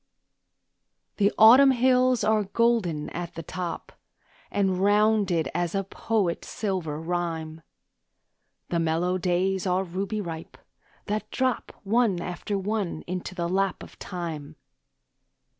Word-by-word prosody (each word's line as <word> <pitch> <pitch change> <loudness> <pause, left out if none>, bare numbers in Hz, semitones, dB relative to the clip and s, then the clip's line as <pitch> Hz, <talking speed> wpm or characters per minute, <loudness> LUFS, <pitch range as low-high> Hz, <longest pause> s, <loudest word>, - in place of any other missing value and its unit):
The 205 -1 +3
Autumn 250 +6 +8
hills 255 -1 +3
are 215 0 +2
golden 200 -8 +1
at 175 -1 -6
the 165 - -6
top, 170 0 -5 0.6
And 190 -2 0
rounded 205 -4 +3
as 175 +1 -1
a 195 - +1
poet's 195 -2 -1
silver 180 -8 -3
rhyme; 165 -2 -3 1.1
The 170 - 0
mellow 165 +3 0
days 185 +2 0
are 185 +1 +1
ruby 195 +4 -3
ripe, 165 -4 -7 0.5
that 210 0 -3
drop 260 -1 -1
One 210 -2 +2
after 180 +3 -3
one 195 -4 -2
into 180 +1 -5
the 170 -2 -1
lap 195 +1 0
of - - -14
time. 160 -5 -6
185 Hz, 120 wpm, -26 LUFS, 170-210 Hz, 1.1 s, Autumn